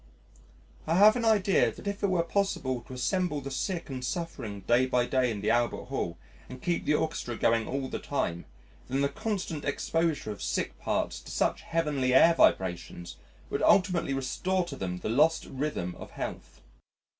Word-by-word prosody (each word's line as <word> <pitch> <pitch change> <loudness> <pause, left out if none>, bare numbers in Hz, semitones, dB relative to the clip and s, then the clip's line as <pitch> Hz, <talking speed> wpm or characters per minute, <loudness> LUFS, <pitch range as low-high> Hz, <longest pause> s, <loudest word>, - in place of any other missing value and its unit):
I 165 - +2
have 210 +4 +7
an 240 -2 -1
idea 205 -3 +3
that - - -13
if 200 0 -3
it 200 - +2
were 180 -2 +2
possible 170 -9 -1
to - - -9
assemble 175 +4 0
the 140 -1 -7
sick 175 +5 -2
and 130 -2 -5
suffering 125 - -4
day 120 +6 +3
by 125 -1 +2
day 130 0 +1
in 105 -3 -4
the 105 - +1
Albert 120 +1 0
Hall 85 -11 -3 0.3
and 130 - -8
keep 170 +5 -1
the 150 - +3
Orchestra 150 -7 -2
going 115 -1 +2
all 135 -1 -2
the - - -4
time, 85 - -2 0.4
then 135 +2 0
the 140 - +2
constant 180 -4 -3
exposure 160 -3 -1
of 105 - -8
sick - - -2
parts - - -1
to - - -11
such - - 0
heavenly 145 -6 0
air 165 +5 +7
vibrations 90 - +1 0.3
would - - -1
ultimately 180 -7 +3
restore 180 +8 -1
to - - -7
them 90 -2 -4
the - - -5
lost 155 +8 +3
rhythm 135 -11 -3
of - - -9
health. - - -7
140 Hz, 180 wpm, -29 LUFS, 120-170 Hz, 0.4 s, have